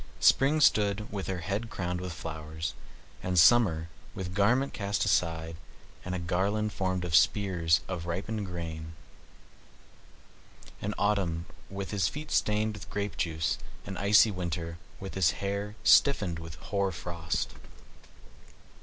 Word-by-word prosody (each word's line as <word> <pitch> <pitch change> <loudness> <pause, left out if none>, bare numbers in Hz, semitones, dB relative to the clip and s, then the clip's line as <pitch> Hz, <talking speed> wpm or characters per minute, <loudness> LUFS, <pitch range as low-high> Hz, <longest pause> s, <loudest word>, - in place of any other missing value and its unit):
Spring 140 +3 +5
stood 105 -6 +3
with 100 -2 -3
her 95 -2 -3
head 100 +5 -3
crowned 90 -3 -3
with 90 -1 -4
flowers, 80 -1 -5 0.5
and 90 0 -1
Summer, 85 -4 +5 0.3
with 90 -1 -5
garment 120 +8 +2
cast 100 0 -1
aside, 85 -4 0 0.5
and 90 - -3
a - - 0
garland 100 +5 0
formed 95 -1 -1
of 85 - -4
spears 85 -2 +3
of 85 -3 -4
ripened 100 +4 -3
grain, 80 -2 -6 1.9
and 105 +1 -2
Autumn, 95 -5 0 0.2
with 100 -1 -5
his 100 -5 +2
feet 150 - -6
stained 105 +1 +1
with 105 - -10
grape 105 0 -3
juice, 80 -1 -1 0.3
and 95 - -5
icy 105 +2 +6
Winter, 85 -2 -4 0.2
with 95 - -7
his 90 -3 +3
hair 100 +1 -3
stiffened 95 - +4
with 80 -1 -8
hoar 100 +1 -1
frost. 85 -1 -3
95 Hz, 135 wpm, -29 LUFS, 85-105 Hz, 1.9 s, icy